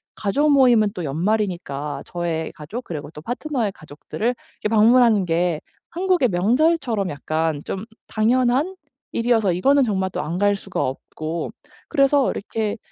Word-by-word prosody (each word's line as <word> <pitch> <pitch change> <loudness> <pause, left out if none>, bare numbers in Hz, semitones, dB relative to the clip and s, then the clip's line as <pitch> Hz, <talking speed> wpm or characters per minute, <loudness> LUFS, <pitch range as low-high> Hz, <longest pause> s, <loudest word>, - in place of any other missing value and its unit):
가족 280 +9 +1
모임은 245 -6 +5
또 180 - -4
연말이니까 155 -4 -2
저의 170 -2 -3
가족 200 +12 -7
그리고 155 -2 -6
또 150 - -10
파트너의 245 - -2
가족들을 155 +9 -6 0.3
이렇게 210 - 0
방문하는 225 -2 +5
게 170 -1 +1 0.3
한국의 360 -6 +2
명절처럼 230 - +1
약간 155 +1 -2
좀 195 +2 -4 0.3
당연한 250 +9 +2 0.4
일이어서 230 -4 +2
이거는 275 +10 +4
정말 190 -4 0
또 - - -3
안 165 +4 -3
갈 205 0 +3
수가 195 -1 -4
없고 155 +5 -5 0.4
그래서 275 0 +3
이렇게 215 +1 -3
205 Hz, 325 characters per minute, -22 LUFS, 170-245 Hz, 0.4 s, 모임은